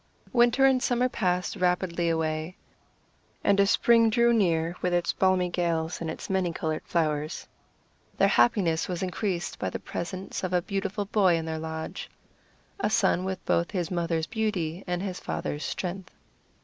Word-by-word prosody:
Winter 240 +2 +4
and 265 -1 +4
summer 250 0 +2
passed 180 -7 -1
rapidly 180 -1 0
away, 160 +1 -2 0.9
and 200 0 +3
as 200 0 +4
spring 230 0 +5
drew 235 +1 +3
near 170 -5 +1
with 180 -1 +1
its 175 -1 +1
balmy 185 -1 +2
gales 170 -2 -1
and 165 - -3
its 160 - -6
many 190 -2 0
colored 155 -1 -3
flowers, 155 -2 -1 0.7
their - - +5
happiness 180 -9 +3
was 180 0 -3
increased 185 -1 -2
by - - -1
the - - -4
presence 185 +3 -5
of 185 0 -2
a 180 - +3
beautiful 200 +1 -2
boy 195 -4 +3
in 165 -1 -2
their 160 -1 -3
lodge, 160 0 -5 0.7
a - - +1
son 190 -4 +2
with 190 -1 -4
both 170 - +1
his 185 -2 -3
mother's 170 -2 0
beauty 190 -6 -2
and 180 +1 -2
his 185 -3 -4
father's 150 - -4
strength. 185 +1 -4
180 Hz, 160 wpm, -27 LUFS, 165-200 Hz, 0.9 s, spring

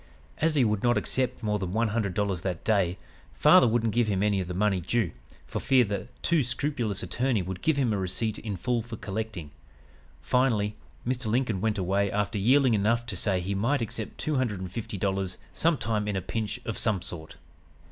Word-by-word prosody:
"As 160 0 +2
he 135 -4 +4
would 105 -2 0
not 120 -2 +3
accept 125 +3 -1
more 105 -1 0
than 95 -2 -3
one 115 +1 +1
hundred 100 -4 -1
dollars 100 -4 0
that 90 -2 -3
day, 95 -5 +2 0.4
father - - +6
wouldn't 115 -1 +1
give 120 -1 +2
him 100 -2 +1
any 100 -2 +2
of 90 - -5
the 90 - -4
money 95 -1 +1
due, 105 -1 0 0.3
for - - -4
fear 130 -2 +4
the 100 -2 -3 0.2
too 165 -2 +3
scrupulous 120 -5 -1
attorney 120 -5 0
would 90 +1 -6
give 160 -2 +2
him 125 -6 +2
a - - 0
receipt 100 +4 -1
in 105 -4 -4
full 120 +5 0
for 115 0 -8
collecting. 100 -7 -5 0.7
Finally, 110 -5 +1 0.3
Mr. 125 -1 -1
Lincoln 115 -4 0
went 110 0 0
away 100 +2 +1
after 105 +1 -1
yielding 130 +4 +4
enough 115 +3 +2
to 120 - -3
say 95 -4 +1
he 95 +3 -2
might 120 +7 +1
accept 110 0 -5
two 155 -2 -1
hundred 115 -7 0
and 95 -1 -6
fifty 105 0 -5
dollars 95 -1 -1 0.2
sometime 115 -10 +1
in 105 - -1
a - - +1
pinch 110 -2 -3
of 110 - -2
some 105 -6 +1
sort. 80 -2 -4
105 Hz, 205 wpm, -27 LUFS, 95-120 Hz, 0.7 s, father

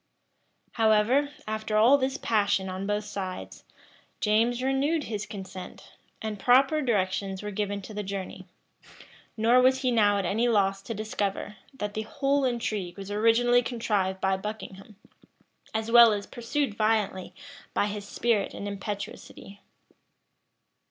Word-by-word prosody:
However, 225 +6 +3 0.2
after 215 0 -2
all 245 +6 +6
this 265 0 -1
passion 200 -3 +1
on 190 +1 -4
both 210 0 -1
sides, 190 -3 -6 0.6
James 230 +4 +2
renewed 280 +4 +1
his 215 -3 -4
consent; 190 -3 -9 0.3
and 215 -2 -4
proper 265 +7 +4
directions 195 -5 -1
were 210 - -4
given 205 0 -3
for 215 - -9
the 210 - -3
journey. 195 -1 -6 0.9
Nor 235 +3 +5
was 260 +1 +3
he 255 -2 +1
now 205 -3 +3
at 195 - -1
any 220 +7 +1
loss 195 -4 +2
to 230 - -6
discover, 210 -1 -3 0.2
that 210 -5 -4
the 215 - -2
whole 275 +5 0
intrigue 215 -7 -2
was 195 0 -7
originally 230 +3 +4
contrived 210 -6 -1
by 190 0 +1
Buckingham, 210 0 -8 0.8
as 220 +1 -3
well 235 -2 +8
as 205 -1 -3
pursued 240 +1 -2
violently 215 -3 0 0.4
by - - +2
his 205 -1 -5
spirit 225 -3 0
and 200 - -5
impetuosity. 200 0 -7
215 Hz, 140 wpm, -27 LUFS, 200-235 Hz, 0.9 s, well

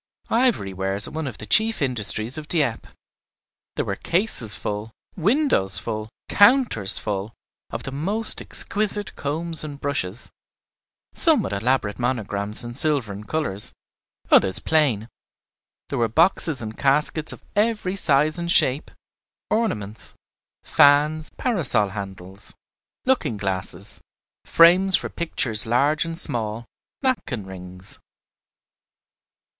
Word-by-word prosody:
Ivory 225 - +1
wares 95 +2 -1
are - - -10
one 160 -1 -4
of 125 - -7
the 110 - -9
chief 220 - +3
industries 120 -2 +3
of 155 -1 -7
Dieppe. 145 -10 -1 0.9
There - - -2
were 100 - -3
cases 170 - +3
full, 105 +1 -5 0.3
windows 200 - +1
full, 110 -1 -3 0.2
counters 205 - +4
full, 105 0 -4 0.3
of - - -6
the 135 - -6
most 200 +11 -2
exquisite 205 -1 -3
combs 160 +3 -1
and 145 -2 -8
brushes, 130 -7 -3 0.8
some 315 - +3
with - - -4
elaborate 110 0 -1
monograms 105 -4 -3
in 120 0 -7
silver 140 -6 +1
and 105 +2 -10
colors, 145 -11 -3 0.6
others 95 0 +4
plain; 135 -9 +1 0.8
there - - -3
were 115 - +2
boxes 160 - +1
and 110 0 -7
caskets 150 +3 +2
of - - -12
every 210 -3 0
size 155 -2 +2
and 170 0 -1
shape, 135 -3 +3 0.6
ornaments, 110 - -2 0.5
fans, 150 +2 +3
parasol 145 - +1
handles, 95 -1 -9 0.5
looking 165 - 0
glasses, 95 -2 -2 0.4
frames 180 +3 +5
for - - -2
pictures 115 -10 +3
large 145 +7 +1
and 165 0 -4
small, 115 -7 +2 0.4
napkin 145 - -2
rings. 90 0 -10
135 Hz, 120 wpm, -22 LUFS, 105-170 Hz, 0.9 s, frames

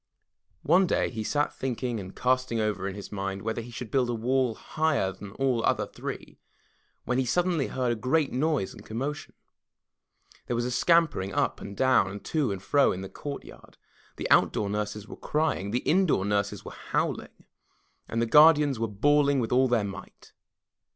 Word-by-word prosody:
One 180 +5 +4
day - - 0
he 110 -2 -4
sat 145 +6 0
thinking 125 -2 -3
and 95 -1 -9
casting 130 -2 0
over 105 -3 -1
in 100 - -5
his 100 - -9
mind 95 -1 -4
whether 110 +1 -2
he 115 - -10
should 120 -1 -7
build 130 -3 +1
a 120 - -1
wall 125 +1 0
higher 155 -11 0
than 100 +2 -10
all 135 -1 +1
the 115 - 0
other - - +1
three, - - -8 0.7
when 125 +1 0
he - - +2
suddenly 170 +2 +1
heard 125 -2 -1
a - - 0
great 135 +6 +1
noise 140 -5 0
and - - -13
commotion. 135 +7 -5 1.1
There 120 - -1
was 120 +1 -1
a 125 - -2
scampering 150 - +2
up - - 0
and 100 0 -8
down 130 -7 +3
and 100 +1 -9
to 150 -8 0
and 95 -1 -5
fro 140 +7 +3
in 95 - -4
the 95 - -7
courtyard. 145 -1 -9 0.4
The - - -4
outdoor 100 -1 +3
nurses 105 0 -3
were - - -9
crying; 150 -10 -1
the 120 +4 -1
indoor 170 - +2
nurses 100 0 -1
were - - -7
howling, - - -3 0.6
and 115 - -2
the 115 - +2
guardians 150 -1 +6
were 115 - 0
bawling 140 +6 +2
with 115 - -2
all 130 +1 +4
their 120 -4 +2
might. 100 -1 -9
120 Hz, 185 wpm, -27 LUFS, 105-140 Hz, 1.1 s, guardians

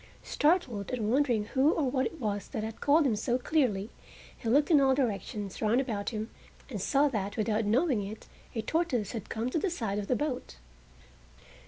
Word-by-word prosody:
Startled, 295 - +1
and 225 -4 -1
wondering 250 -5 +2
who 275 +7 +3
or 300 -4 0
what 260 -2 +1
it 330 - -10
was 205 -4 -2
that 215 - -4
had 220 0 -6
called 295 +2 +4
him 240 -5 +2
so 240 +4 0
clearly, 245 -8 0 0.4
he 225 - -4
looked 290 +7 +3
in 295 -3 +6
all 265 -1 +4
directions 205 -5 -2
round 225 +3 +3
about 220 -7 -2
him 220 -1 -5 0.4
and 205 -6 -4
saw 280 +8 +3
that 205 -4 -3
without 215 0 +1
his 205 - +1
knowing 255 -2 +2
it 215 +2 -9 0.3
a 225 - -1
tortoise 265 - 0
had 225 -5 -6
come 230 +3 -2
to 325 - +1
the 390 - 0
side 220 - -2
of 200 - -5
the 255 - +2
boat. 270 - -3
240 Hz, 200 wpm, -30 LUFS, 210-280 Hz, 0.4 s, in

